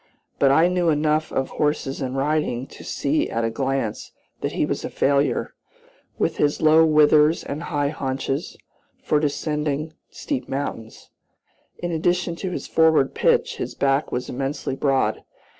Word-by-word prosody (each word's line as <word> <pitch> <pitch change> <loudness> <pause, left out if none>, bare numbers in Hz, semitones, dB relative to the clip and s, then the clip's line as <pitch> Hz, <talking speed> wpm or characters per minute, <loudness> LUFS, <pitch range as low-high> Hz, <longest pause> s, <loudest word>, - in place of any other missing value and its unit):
But 140 - +5
I 160 +5 +5
knew 180 -1 +1
enough 155 0 +1
of 135 - -1
horses 150 -2 -1
and 130 0 -3
riding 140 -3 0
to - - -13
see 145 +2 -1
at 115 - -1
a 115 - 0
glance 135 -2 -2 0.3
that - - -3
he - - +1
was - - -3
a - - -3
failure, 140 +1 +1 0.6
with - - 0
his 145 0 +1
low 155 +1 +6
withers 155 0 +4
and 145 +3 -5
high 145 -4 -1
haunches, 135 0 -3 0.5
for 150 - +2
descending 150 0 -2 0.2
steep 285 -4 -4
mountains. 135 -5 -5 0.7
In 175 0 -4
addition 175 +1 0
to 190 - -3
his 180 - -5
forward 160 -4 +3
pitch, 475 -1 +1
his 385 - -5
back 140 +1 +1
was 125 +1 -3
immensely 135 +1 -3
broad. 135 -1 0
150 Hz, 155 wpm, -23 LUFS, 135-160 Hz, 0.7 s, low